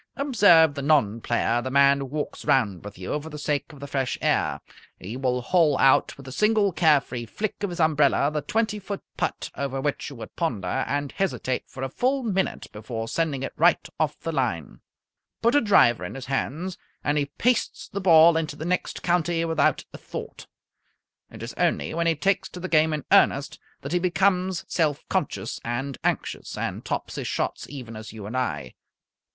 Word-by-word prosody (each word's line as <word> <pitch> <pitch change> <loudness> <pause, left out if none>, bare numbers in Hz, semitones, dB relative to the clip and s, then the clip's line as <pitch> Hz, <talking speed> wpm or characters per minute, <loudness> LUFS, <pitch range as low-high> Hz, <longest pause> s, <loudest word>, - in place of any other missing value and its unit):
Observe 200 - +5
the 140 - -5
non 135 -7 +2
player, 120 0 +1
the 130 - -4
man 140 +1 +5
who 135 - -3
walks 150 +3 -5
round 100 -10 +1
with 105 -2 -9
you 95 +11 -3
for 160 - -9
the 150 - -8
sake 145 0 -2
of 145 - -13
the 140 - -7
fresh 135 -3 -2
air. - - +1 0.4
He 100 +6 -7
will 125 -1 0
hole 160 -2 +3
out 135 - +4
with 135 -1 -12
a - - -7
single 210 - +2
care 155 -4 +4
free 120 -3 -7
flick 210 - -4
of 200 - -1
his 175 - -7
umbrella 150 -2 +3
the 150 -1 -2
twenty 215 +6 -1
foot 200 0 -6
putt - - -3
over 135 -1 -3
which 145 +1 -2
you 140 - -10
would 115 - -10
ponder 135 - -1
and 145 0 -2
hesitate 160 -9 -2
for 130 - -7
a - - 0
full 260 - 0
minute 195 -4 -1
before 115 +1 -5
sending 145 -1 -1
it - - -4
right - - +3
off - - 0
the - - -4
line. - - -2 0.6
Put 235 - +4
a 290 - +5
driver 120 - +4
in 90 - -6
his 135 -2 -7
hands 155 +7 -3 0.2
and 145 - +1
he 145 -1 +1
pastes 240 - 0
the 200 - -5
ball 165 -2 +7
into 155 -2 -2
the 155 - -6
next 180 +1 -2
county 170 -1 +1
without 165 -1 +1
a - - -9
thought. - - -8 0.8
It - - -10
is - - -6
only 70 0 0
when 170 0 0
he 165 - +3
takes 195 +6 0
to 180 - -9
the 185 - -4
game 160 -2 +3
in 150 -2 -3
earnest 140 +1 +3 0.2
that 140 - -6
he 175 - +3
becomes 180 +1 +1
self 155 -4 0
conscious - - -2
and 135 +3 -3
anxious, - - -2
and - - -3
tops - - -3
his - - -3
shots - - -3
even 125 -5 -8
as 110 0 -8
you 110 -3 -9
and 110 +5 -6
I. 75 - -2
145 Hz, 200 wpm, -25 LUFS, 130-175 Hz, 0.8 s, ball